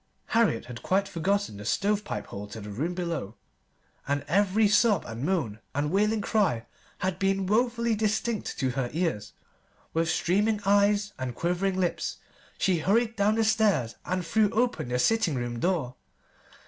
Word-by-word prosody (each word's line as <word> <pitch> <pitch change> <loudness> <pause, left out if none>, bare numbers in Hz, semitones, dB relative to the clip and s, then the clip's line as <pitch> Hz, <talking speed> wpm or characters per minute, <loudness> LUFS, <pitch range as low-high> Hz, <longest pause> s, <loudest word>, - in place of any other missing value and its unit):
Harriet 225 - +2
had 120 -1 -8
quite 195 +1 +1
forgotten 195 - -1
the 105 - -8
stove 205 - +1
pipe - - -4
hole 100 +1 -7
to 105 +2 -8
the 105 0 -8
room 155 - -2
below, 165 - -3 0.7
and 145 0 -1
every 205 +5 +3
sob 210 -2 +3
and 115 +2 -6
moan 145 - -1 0.2
and 145 +2 0
wailing 210 +3 +2
cry 185 - +1 0.3
had 185 -1 -2
been 195 0 +1
woefully 235 +3 +1
distinct 215 +1 -1
to 130 -3 0
her 125 -1 -2
ears. 160 - -2 0.6
With 165 0 +1
streaming 205 +6 +1
eyes 205 +1 +3
and 125 -2 -4
quivering 185 +2 0
lips 175 -2 -1 0.4
she 185 -3 +2
hurried 225 +7 +2
down 210 +1 +2
the 225 - +2
stairs 205 - +2
and 185 -1 -2
threw 210 +5 +3
open 230 - 0
the 125 - 0
sitting 225 - +2
room 120 -1 -3
door. 160 -6 0
185 Hz, 160 wpm, -27 LUFS, 140-210 Hz, 0.7 s, every